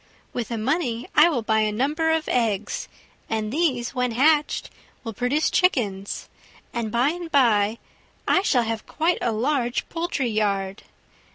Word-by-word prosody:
With 240 -2 -3
the 230 - -3
money 245 0 -1
I 305 +3 +7
will 250 -9 -1
buy 220 0 +2
a 215 -1 +1
number 295 +9 0
of 320 -1 +1
eggs, 220 -4 -1 0.4
and 220 0 -2
these, 275 -7 0
when 250 -2 -1
hatched, 295 +4 +2 0.3
will 225 -2 -5
produce 250 +8 0
chickens, 205 - 0 0.5
and 230 -2 -2
by 245 +5 +2
and 340 0 -5
by 225 -5 +3 0.5
I 375 - +4
shall 260 -11 +2
have 225 -1 -4
quite 330 +3 0
a 235 - +1
large 245 +2 0
poultry 330 -7 -2
yard. 200 -2 -1
245 Hz, 155 wpm, -24 LUFS, 220-300 Hz, 0.5 s, I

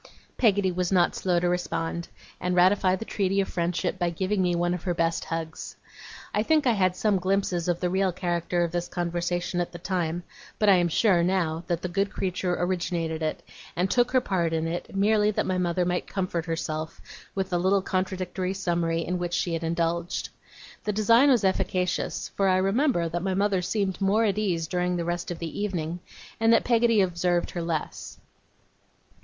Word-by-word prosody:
Peggotty 200 -5 +3
was 180 0 -1
not 180 -2 +3
slow 180 -2 +1
to 175 - 0
respond, 170 -1 -2 0.3
and 180 0 -1
ratify 185 +1 +4
the 225 - -6
treaty 195 -2 0
of 195 - +1
friendship 175 +1 -2
by 175 -1 +1
giving 190 +4 -1
me 180 -1 +1
one 175 +1 +1
of 180 - -4
her 175 -2 -2
best 165 0 0
hugs. 165 -1 -5 0.6
I 210 - +2
think 305 +6 +2
I 245 - +5
had 185 -4 +2
some 205 -1 +1
glimpses 185 -2 0
of 175 -1 0
the 180 - 0
real 190 0 +2
character 175 0 -1
of 170 - -2
this 175 0 -2
conversation 175 +1 -2
at 175 - -4
the - - -6
time; 175 -1 -2 0.3
but 210 - +3
I 190 - +7
am 175 -1 +2
sure, 180 +1 +3
now, 170 -2 0
that 170 -1 -2
the - - 0
good 195 +3 0
creature 185 -2 -2
originated 170 -3 -2
it, 155 -1 -2 0.3
and 180 +2 0
took 245 0 +3
her 255 -1 +3
part 175 -7 0
in 160 0 0
it, 170 +3 -4
merely 210 +1 +3
that 215 - 0
my 185 -1 0
mother 175 0 +1
might 180 0 -1
comfort 180 -3 -2
herself 160 -1 -3 0.4
with 190 -1 -2
the 175 - +1
little 190 +2 +2
contradictory 185 0 -2
summary 170 -3 0
in 180 0 -2
which 175 0 -2
she 180 -1 -1
had 165 0 -2
indulged. 170 +1 -1 0.5
The 210 - 0
design 230 +6 +5
was 245 -6 +4
efficacious; 185 -1 0
for 195 - +2
I 185 -1 +4
remember 195 - +2
that 170 +1 -3
my 190 +1 -1
mother 200 -1 +1
seemed 195 +1 -1
more 200 +3 +3
at 205 -1 +1
ease 175 -6 0
during 180 +1 -1
the 170 -1 -2
rest 175 +1 -3
of 175 - -4
the 165 +2 -6
evening, 175 -4 -2 0.4
and 225 0 +4
that 230 - +4
Peggotty 230 -3 +3
observed 175 -1 0
her 175 - -4
less. 165 -2 -4
180 Hz, 195 wpm, -26 LUFS, 170-195 Hz, 0.6 s, I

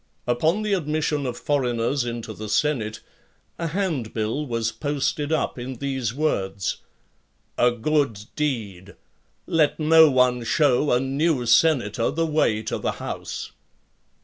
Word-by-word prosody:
Upon 160 - +1
the 210 -1 0
admission 150 -4 -1
of 120 - -4
foreigners 125 -2 0
into 115 -2 -5
the 110 0 -7
senate, 115 -4 0 0.6
a 170 - -1
hand 160 - -2
bill 115 +7 -2
was 115 -2 -1
posted 145 +1 -2
up 155 -5 -1
in 130 +2 -5
these 130 -3 -2
words: 100 -9 -1 0.8
"A 125 - +4
good 120 -3 0
deed! 105 -10 -3 0.5
let 165 -4 +2
no 160 0 +7
one 125 -2 +2
shew 140 +3 +2
a 125 - +4
new 135 0 0
senator 120 -3 +3
the 165 +3 0
way 150 -9 +1
to 110 - -3
the - - -1
house." - - -6
130 Hz, 135 wpm, -24 LUFS, 115-150 Hz, 0.8 s, no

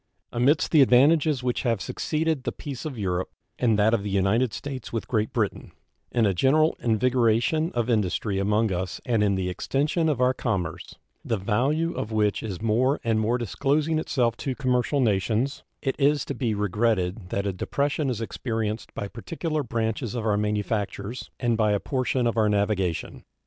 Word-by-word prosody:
Amidst 135 +6 +2
the 155 - +6
advantages 140 +2 +4
which 125 -1 0
have 115 -5 0
succeeded 155 - -1
the - - -2
peace 140 -2 -7
of 145 -5 -5
Europe, 90 -3 -1 0.3
and 115 -4 +3
that 105 +2 +3
of 115 - +2
the 100 - -4
United 100 +5 +2
States 135 -1 -6
with 115 - -3
Great 110 -3 0
Britain, 110 -4 -2 0.4
in 115 -2 +2
a 100 - +2
general 150 - +3
invigoration 120 - +2
of 120 -1 0
industry 105 -3 0
among 105 +2 +1
us 90 0 -3
and 115 -4 +2
in 100 -1 +2
the 95 -1 -1
extension 145 - 0
of 145 -5 0
our 125 0 +3
commerce, 90 -9 -3 0.3
the 115 - -1
value 135 - 0
of 110 - -4
which 105 -2 +1
is 100 -5 -5
more 125 +6 +2
and 115 -1 +1
more 115 +3 +1
disclosing 145 +7 0
itself 120 -7 0
to 135 -2 -3
commercial 130 +1 +1
nations, 110 +4 0 0.2
it 135 -2 0
is 145 +1 +3
to - - -3
be 120 -4 -1
regretted 105 -2 0
that 100 +1 -2
a 100 - -1
depression 140 - -1
is 115 -3 -2
experienced 110 -1 -3
by 100 - -3
particular 155 - -3
branches 115 -1 -2
of 115 -2 -3
our 105 -2 +2
manufactures 105 +1 -2
and 120 -2 +1
by 105 -2 +2
a 100 - +1
portion 130 0 -1
of 115 0 0
our 110 -1 +3
navigation. 100 -4 -1
115 Hz, 180 wpm, -25 LUFS, 105-135 Hz, 0.4 s, the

